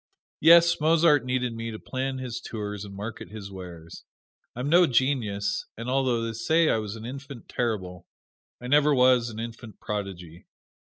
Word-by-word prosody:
Yes, 170 +1 +6
Mozart 155 -3 +4
needed 125 -1 -1
me 115 0 -5
to 110 - -6
plan 130 +3 -4
his 125 -2 -5
tours 105 -2 -5
and 100 -1 -10
market 105 +3 -7
his 100 -2 -9
wares. 85 -3 -10 0.5
I'm 125 +3 -3
no 175 +3 +5
genius, 115 -6 0
and 115 +2 -4
although 130 -3 +1
they 115 0 -3
say 160 +9 +2
I - - +3
was 105 -1 -4
an 110 0 -9
infant 135 0 -8
terrible, 95 -7 -3 0.5
I 125 - -10
never 145 +2 +4
was 125 -2 +4
an 110 -1 -8
infant 115 -2 -8
prodigy. 90 -5 -6
115 Hz, 165 wpm, -26 LUFS, 105-135 Hz, 0.5 s, Yes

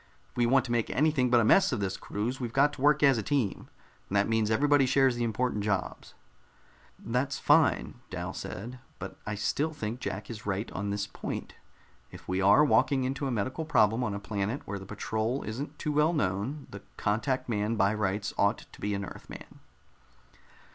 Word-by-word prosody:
If - - -35
we 120 -1 +2
want 130 +1 +4
to 120 - -5
make 120 -2 0
anything 145 -4 +2
but 120 -1 +5
a - - +3
mess 190 - +5
of 120 - -1
this 95 -1 -2
cruise, 115 +6 -4
we've 120 -3 -3
got 145 +3 +3
to 135 - -9
work 150 +1 +4
as 135 -4 +5
a - - -1
team, 120 -3 -1 0.4
and 100 - -3
that 100 - +3
means 110 -1 +1
everybody 140 +3 +3
shares 135 -1 +3
the 120 - -1
important 115 -1 -1
jobs." 100 -2 -3 0.8
"That's 125 +4 -2
fine," - - +3
Dal - - -5
said, 120 +7 -7 0.2
"but - - -8
I 105 - -2
still 145 +10 -1
think 115 -4 -4
Jack 105 -5 -4
is 110 -1 -8
right 105 +3 -2
on 100 +1 -3
this 100 0 -1
point. - - -6 0.6
If - - -12
we 95 +1 0
are 100 +10 +6
walking 140 -2 +3
into 135 +2 -2
a - - -2
medical 125 +8 -2
problem 115 -6 +3
on 105 -4 -2
a - - -4
planet 105 +5 -3
where 100 0 -4
the 95 - -11
patrol 110 +4 -2
isn't 140 +7 -5
too 150 - -2
well 150 +3 +3
known, 130 - -1
the 100 - -8 0.2
contact 115 +6 0
man 110 -1 0
by 100 -1 +3
rights 105 0 -1
ought 100 +3 +2
to - - -15
be 105 0 -1
an 100 0 -3
Earthman." - - -11
115 Hz, 200 wpm, -29 LUFS, 105-135 Hz, 0.8 s, are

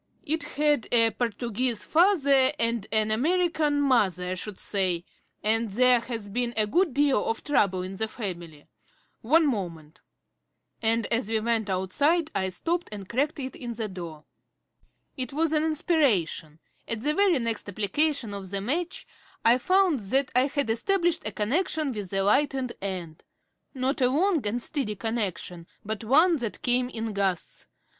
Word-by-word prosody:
It 315 +2 0
had 295 -3 0
a 230 -1 +4
Portuguese 235 +1 -2
father 285 -7 +4
and 230 -3 -1
an 215 0 +1
American 310 +3 +1
mother, 195 - +2
I - - 0
should 190 +2 -5
say, 185 -4 -1 0.4
and 225 +1 +2
there 250 +4 +4
has 230 -3 -6
been 240 +3 -2
a 215 - +3
good 340 - +2
deal 280 -6 +3
of 225 - -2
trouble 195 -11 +1
in 190 +1 -6
the 220 - 0
family. 175 -9 -7 0.6
One 315 +8 +4
moment" 170 - -4 0.8
and 225 0 +1
as 230 -2 0
we 225 -1 +1
went 220 -1 0
outside 290 - +1
I 190 0 -1
stopped 335 - -2
and 200 -3 -7
cracked 285 +7 -1
it 260 -1 -5
in 240 -2 -6
the 225 -1 -3
door. 170 -5 -8 0.9
It 255 0 -4
was 320 +1 +1
an 305 0 +3
inspiration. 280 - +1 0.3
At 225 -1 -2
the 300 +1 +2
very 385 -1 +3
next 230 -4 -1
application 225 - 0
of 195 -2 -6
the 200 +1 -2
match 320 - -3 0.4
I 235 +2 +6
found 370 0 +3
that 260 +7 0
I 255 +2 +4
had 280 -5 -1
established 345 - +1
a - - -2
connection 295 - 0
with 205 -5 -5
the 195 0 0
lighted 265 +3 +1
end. 180 -5 -5 0.5
Not 265 +2 -1
a 250 - +4
long 330 +3 +2
and 235 +3 -2
steady 265 -9 -2
connection, 195 -6 -4 0.2
but 215 +1 -4
one 315 +9 +4
that 235 -5 -5
came 250 0 +1
in 225 -3 -4
gusts. 195 -3 -2
235 Hz, 160 wpm, -26 LUFS, 200-290 Hz, 0.9 s, I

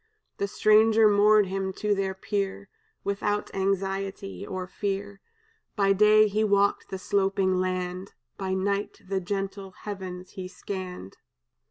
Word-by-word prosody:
"The 200 - -1
stranger 215 +2 +5
moored 210 0 +5
him 190 0 -2
to 210 +2 0
their 195 -1 -1
pier 200 0 -3 0.3
Without 205 +1 -1
anxiety 195 0 -2
or 185 -1 -4
fear; 200 +1 -4 0.5
By 195 -2 +3
day 215 +2 +6
he 210 +1 0
walked 200 -1 +2
the 190 - -4
sloping 195 -1 +1
land, 185 0 -3 0.2
By 190 -1 -2
night 200 +1 -2
the 190 0 -1
gentle 195 0 -4
heavens 185 -3 -6
he 185 -1 -6
scanned. 185 - -7
195 Hz, 130 wpm, -27 LUFS, 190-205 Hz, 0.5 s, day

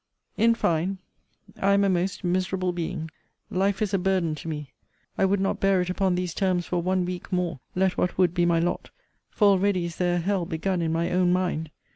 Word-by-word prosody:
In 230 +1 +4
fine, 175 -1 0 0.6
I 195 +1 +4
am 200 0 +4
a - - +3
most 185 +2 -1
miserable 185 0 0
being. 160 -2 -4 0.4
Life 195 +2 +1
is 205 -1 -2
a 195 - +3
burden 180 -3 +1
to 155 +2 -8
me. 150 -3 -5 0.4
I - - +2
would 195 +1 +2
not 195 - 0
bear 195 -1 +3
it 180 0 -1
upon 185 -1 +1
these 180 -2 -2
terms 185 -3 0
for 175 -1 -1
one 185 +1 +1
week 180 0 -6
more, 180 -5 -1 0.2
let 190 0 +1
what 180 - 0
would 180 -2 +3
be 175 -1 +2
my 170 -1 +3
lot; 170 +2 -1 0.4
for 205 -2 +3
already 195 -2 +2
is 170 0 -6
there 175 -1 +1
a - - +1
hell 185 0 -1
begun 180 +1 -1
in 165 -1 0
my 165 +1 0
own 180 0 +3
mind. 180 -4 0
180 Hz, 215 wpm, -26 LUFS, 175-190 Hz, 0.6 s, In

